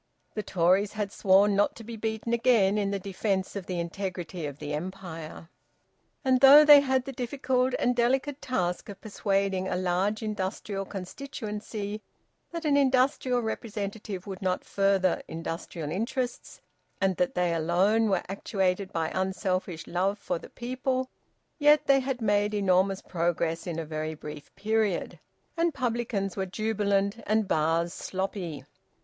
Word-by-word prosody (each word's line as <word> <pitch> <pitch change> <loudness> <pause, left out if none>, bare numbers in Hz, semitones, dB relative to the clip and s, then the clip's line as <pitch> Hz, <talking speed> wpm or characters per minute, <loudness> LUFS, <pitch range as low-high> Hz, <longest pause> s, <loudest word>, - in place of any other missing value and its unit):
The 215 - -2
Tories 190 +2 +2
had 210 -2 -3
sworn 200 +1 +4
not 205 +1 +2
to 230 - -10
be 230 +1 -7
beaten 220 +1 -3
again 225 -4 +3
in 200 -1 0
the 200 - -1
defence 195 0 -2
of 195 -3 -5
the 180 -2 -2
integrity 175 -2 -4
of 140 -1 -7
the 150 0 -5
Empire. 165 -1 -6 0.8
And 260 -1 +3
though 285 +2 +10
they 295 -1 +10
had 265 -2 +1
the 275 - -5
difficult 255 0 0
and 245 0 +1
delicate 265 +4 +1
task 180 -9 -2
of 200 - -8
persuading 195 -3 -1
a - - -1
large 185 +4 0
industrial 200 -1 -3
constituency 210 0 -6 0.5
that 335 -1 -6
an 290 -2 +3
industrial 260 -2 +2
representative 210 -3 -4
would 190 -2 -7
not 185 -1 0
further 195 -2 +2
industrial 165 -1 -5
interests, 245 +6 -3 0.4
and 195 -1 +2
that 180 - 0
they 180 -1 +1
alone 185 +7 +2
were 190 -3 +1
actuated 195 0 -1
by 160 -3 -1
unselfish 185 -2 -2
love 190 +4 0
for 185 - -3
the - - -12
people, 255 +1 -2 0.5
yet 295 0 +5
they 275 -1 +5
had 260 -3 -3
made 205 0 +2
enormous 190 -1 +2
progress 170 -1 -1
in 170 -2 -3
a 165 - -3
very 155 0 -4
brief 150 -1 -9
period, 215 -3 0 0.4
and 335 -2 +1
publicans 230 -6 -1
were 190 -1 -2
jubilant 200 +1 0
and 215 -1 +2
bars 165 +2 +1
sloppy. 185 -7 -4
200 Hz, 150 wpm, -28 LUFS, 180-230 Hz, 0.8 s, though